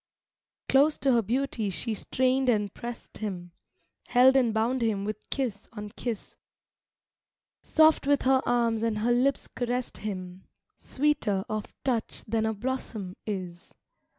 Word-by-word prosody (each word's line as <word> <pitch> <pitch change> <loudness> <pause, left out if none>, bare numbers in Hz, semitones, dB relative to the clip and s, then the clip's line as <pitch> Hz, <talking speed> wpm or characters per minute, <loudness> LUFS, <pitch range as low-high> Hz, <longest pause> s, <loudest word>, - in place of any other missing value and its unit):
V - - -66
Close 285 +3 +4
to 270 0 +2
her 235 -2 +4
beauty 235 -1 -1
she 190 +5 -1
strained 260 +4 +1
and 210 -4 +1
pressed 240 0 -8
him, 180 -5 -5 0.6
Held 260 +2 +6
and 250 -4 +4
bound 230 +4 0
him 210 -4 0
with 215 +1 -6
kiss 235 -7 -2
on 210 -2 -6
kiss; 225 0 -5 1.2
Soft 315 -3 +4
with 285 -1 +3
her 265 0 +4
arms 235 -2 +2
and 225 -2 0
her 225 +3 +1
lips 255 +3 +2
caressed 245 0 -3
him, 185 -3 -6 0.3
Sweeter 260 -9 0
of 215 -1 -4
touch 240 -4 -1
than 220 0 0
a 220 - 0
blossom 215 -5 -4
is. 180 -4 -6
230 Hz, 145 wpm, -28 LUFS, 210-260 Hz, 1.2 s, Held